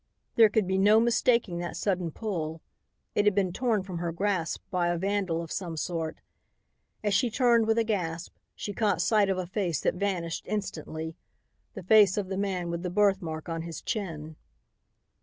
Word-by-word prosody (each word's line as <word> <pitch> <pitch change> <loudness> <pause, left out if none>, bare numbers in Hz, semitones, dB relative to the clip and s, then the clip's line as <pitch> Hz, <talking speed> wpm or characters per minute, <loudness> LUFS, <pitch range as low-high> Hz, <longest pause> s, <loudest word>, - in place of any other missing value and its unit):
There 225 -2 +7
could 210 -1 +1
be 190 +1 0
no 210 +3 +6
mistaking 235 -5 +2
that 175 0 -4
sudden 180 -4 0
pull. 165 -4 -4 0.5
It 205 - +2
had 210 -2 +4
been 190 -3 +1
torn 225 -3 0
from 185 -3 -6
her 170 -1 -2
grasp 180 -1 -1
by 180 -2 +1
a 175 0 0
vandal 190 -3 -1
of 165 - -10
some 170 -4 -4
sort. 165 -1 -3 0.8
As 205 -1 +1
she 245 +4 +3
turned 235 -1 +3
with 225 0 +2
a 230 - +4
gasp, 180 -6 -3 0.2
she 205 - -5
caught 205 -4 +1
sight 210 -2 +3
of 190 - +1
a 185 - -2
face 180 -4 -1
that - - +1
vanished 180 -3 -2
instantly, 160 -5 -4 0.6
the - - -7
face 205 0 +6
of 195 -2 -2
the 190 - -3
man 185 -4 -2
with 170 0 -3
the 180 - -3
birthmark 185 -5 +1
on 165 -1 -3
his 165 -1 -6
chin. 160 -7 -4
185 Hz, 185 wpm, -28 LUFS, 170-210 Hz, 0.8 s, There